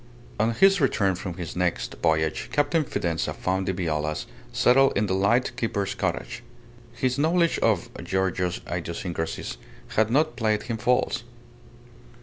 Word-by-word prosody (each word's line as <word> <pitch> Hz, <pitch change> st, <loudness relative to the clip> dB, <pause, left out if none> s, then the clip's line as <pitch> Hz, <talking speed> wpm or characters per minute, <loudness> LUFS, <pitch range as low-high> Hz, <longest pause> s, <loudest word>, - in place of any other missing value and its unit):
On 110 Hz, +2 st, +3 dB
his 195 Hz, +6 st, +5 dB
return 100 Hz, -8 st, +2 dB
from 90 Hz, -1 st, -5 dB
his 85 Hz, -2 st, -6 dB
next 90 Hz, -1 st, -1 dB
voyage, 80 Hz, -1 st, +1 dB
Captain 145 Hz, +2 st, +2 dB
Fidanza 85 Hz, -, -2 dB
found 95 Hz, +1 st, -1 dB
the -, -, +2 dB
Violas 75 Hz, -4 st, -2 dB, 0.3 s
settled 135 Hz, 0 st, +4 dB
in 105 Hz, -, +2 dB
the 95 Hz, -, -1 dB
light 115 Hz, +6 st, +2 dB
keeper's 100 Hz, -5 st, -1 dB
cottage. -, -, -3 dB, 0.5 s
His 125 Hz, +2 st, -1 dB
knowledge 170 Hz, +2 st, +2 dB
of 110 Hz, -6 st, +1 dB
Giorgio's 95 Hz, -1 st, -1 dB
idiosyncrasies 85 Hz, -6 st, -4 dB, 0.3 s
had 110 Hz, 0 st, +2 dB
not 155 Hz, +6 st, +2 dB
played 110 Hz, -2 st, 0 dB
him 115 Hz, -2 st, -3 dB
false. 125 Hz, +2 st, +1 dB
100 Hz, 135 wpm, -25 LUFS, 90-125 Hz, 0.5 s, his